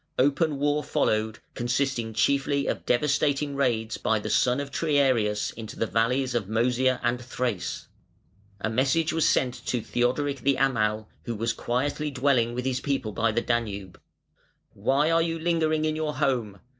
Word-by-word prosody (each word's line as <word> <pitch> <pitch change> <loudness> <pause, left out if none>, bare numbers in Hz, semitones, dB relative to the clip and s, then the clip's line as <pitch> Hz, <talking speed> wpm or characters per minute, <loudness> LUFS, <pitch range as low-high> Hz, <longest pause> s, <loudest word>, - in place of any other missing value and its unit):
Open 145 +3 +2
war 145 +1 +1
followed, 110 0 0 0.2
consisting 120 -1 -1
chiefly 140 +4 +1
of - - -3
devastating 140 +2 +1
raids 115 -5 0
by 110 - +1
the 105 - -4
son 125 +1 +3
of 140 0 -5
Triarius 130 -9 +1
into 110 -1 -9
the - - 0
valleys 125 +4 +1
of 115 -5 -1
Mœsia 125 +4 +1
and 120 +1 0
Thrace. 120 -6 -3 0.7
A 100 - -2
message 135 +8 +1
was 165 -2 +3
sent 125 -2 +2
to 125 - 0
Theodoric 130 +5 -1
the 140 +3 +2
Amal, 110 -5 +1 0.2
who 120 - -3
was 115 +2 -1
dwelling 125 +6 -1 0.2
quietly 130 -3 +3
with 125 +1 -4
his 130 -1 0
people 135 -6 -1
by 110 +2 +1
the 120 - 0
Danube. 105 -6 -3 0.7
"Why 145 +4 +1
are 165 0 +4
you 165 0 -1
lingering 160 -2 +1
in 155 0 0
your 155 -1 -2
home? 125 -8 -1
130 Hz, 160 wpm, -26 LUFS, 115-140 Hz, 0.7 s, are